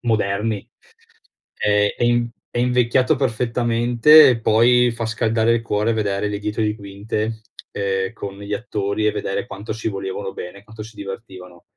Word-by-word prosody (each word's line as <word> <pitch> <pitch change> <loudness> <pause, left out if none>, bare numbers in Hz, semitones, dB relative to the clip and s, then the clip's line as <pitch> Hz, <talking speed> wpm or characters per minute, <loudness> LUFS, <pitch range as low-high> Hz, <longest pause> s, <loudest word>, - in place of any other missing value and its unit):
moderni. 105 -2 -1 0.9
Ehm, 105 0 +3
è - - 0
in 120 0 +2 0.2
è - - -1
invecchiato 125 +3 +2
perfettamente, 120 +3 +4
e 120 -3 +1
poi 120 +2 +4
fa 115 -1 -4
scaldare 115 +1 +1
il 115 - -1
cuore 110 0 0
vedere 105 -1 -1
le 105 0 -3
dietro 105 +2 -3
di 105 0 0
quinte, 105 +2 -4 0.3
ehm, 95 0 -1
con 100 -3 -8
gli 100 0 -7
attori 105 -1 -2
e - - +4
vedere 95 - -3
quanto 100 +2 -6
si 110 +1 -3
volevano 95 -1 -5
bene 90 +3 -8
e - - -17
quanto 110 0 -10
si 110 0 -13
divertivano. 95 -3 -9
110 Hz, 165 wpm, -21 LUFS, 100-115 Hz, 0.9 s, perfettamente